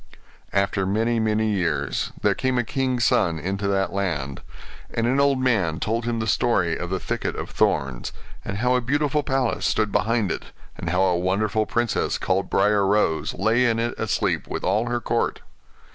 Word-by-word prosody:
After 100 -1 +1
many, 115 +4 +1
many 110 0 +1
years 75 -9 -1
there - - +4
came 130 -1 -1
a 120 - +2
king's 130 0 0
son 85 -5 +2
into 95 +5 -2
that 95 -2 0
land: 75 -9 -2 0.5
and 115 - -1
an 130 +3 +2
old 140 -1 +3
man 95 -11 +1
told 115 +3 -1
him 120 -1 -1
the 110 - -1
story 95 -8 +1
of 90 - -5
the 95 0 -1
thicket - - -3
of - - -6
thorns; 65 -3 0 0.3
and 100 - -4
how 125 +4 +2
a 125 - +2
beautiful 145 +4 +1
palace 135 -4 -1
stood 105 -1 +1
behind 105 -1 +1
it, - - -4 0.3
and - - -4
how 90 +1 +2
a 90 -2 +3
wonderful 105 +4 0
princess, 120 -1 0
called - - -1
Briar 105 -1 +3
Rose, 95 -5 +1
lay 110 +5 +2
in 115 -1 +1
it 115 +1 -1
asleep, - - 0
with - - -4
all 105 +6 +1
her 120 0 0
court. 120 - -1
105 Hz, 185 wpm, -23 LUFS, 95-120 Hz, 0.5 s, there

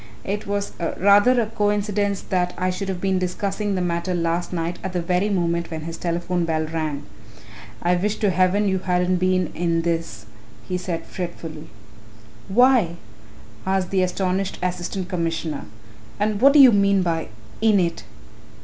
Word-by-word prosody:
"It 205 +1 -3
was 200 0 -2 0.3
rather 205 +6 +5
a 230 - +2
coincidence 205 -2 0
that 180 -1 0
I 185 0 0
should 195 +2 -4
have 185 -2 -3
been 190 0 +1
discussing 195 +3 -2
the 185 - -1
matter 170 +1 -1
last 170 +1 -1
night 170 0 -3
at 190 - -4
the 180 - 0
very 180 +4 +1
moment 170 -3 0
when 160 -2 -5
his 165 +1 -6
telephone 175 +1 -1
bell 160 -1 0
rang 155 -3 -3 0.8
I 175 +1 +3
wish 205 +4 0
to 205 -3 +1
heaven 185 +3 +2
you 190 -1 +1
hadn't 180 0 +1
been 185 -1 +1
in 165 -1 0
this," 165 -11 -2 0.4
he 185 - -2
said 175 -2 -4
fretfully. 165 -3 -7 0.8
"Why?" 235 -5 +4 0.7
asked 190 -1 0
the 190 -1 +2
astonished 185 +1 -1
Assistant 180 +1 -3
Commissioner, 165 -4 -2 0.5
"and 210 0 0
what 275 +2 +7
do 295 - +6
you 265 -3 +10
mean 200 -2 +3
by 165 -2 -1 0.3
'in 215 -3 +4
it'?" 170 -2 -1
185 Hz, 160 wpm, -22 LUFS, 170-200 Hz, 0.8 s, you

